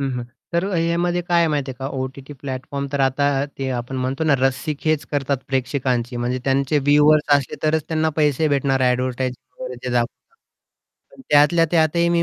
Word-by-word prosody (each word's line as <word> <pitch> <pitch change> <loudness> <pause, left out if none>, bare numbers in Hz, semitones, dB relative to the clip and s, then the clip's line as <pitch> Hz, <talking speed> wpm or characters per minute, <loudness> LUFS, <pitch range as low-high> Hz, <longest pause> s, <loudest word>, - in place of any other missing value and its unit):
हं, 135 -1 -1
हं. 120 - -4 0.3
तर 170 +2 +1
ह्यामध्ये 175 +1 +1
काय 175 -1 +3
आहे 170 - +4
माहिती 145 -3 -1
आहे 130 - -8
का, 135 - -4
ओ-टी-टी 135 +2 -6
प्लॅटफॉर्म 140 +1 -4
तर 140 - 0
आता 135 +1 +2 0.3
ते 135 -1 -2
आपण 125 +2 -5
म्हणतो 135 +5 -2
ना, 150 -3 +4
रस्सीखेच 145 +4 0
करतात 140 -1 0
प्रेक्षकांची 130 -2 -1
म्हणजे 120 +1 -1
त्यांचे 135 +2 +2
व्ह्यूअर्स 150 0 +5
असले 140 -2 -4
तरच 155 0 +2
त्यांना 160 -1 +1
पैसे 150 0 +2
भेटणार 135 -2 +1
एडव्हर्टायझिंग 130 +1 -3
वगैरे 125 0 -6
दाखवता. 120 - -2 0.8
पण - - -14
त्यातल्या 150 +3 +5
त्यातही 170 +1 +3
मी 170 0 +2
140 Hz, 170 wpm, -21 LUFS, 130-155 Hz, 0.8 s, व्ह्यूअर्स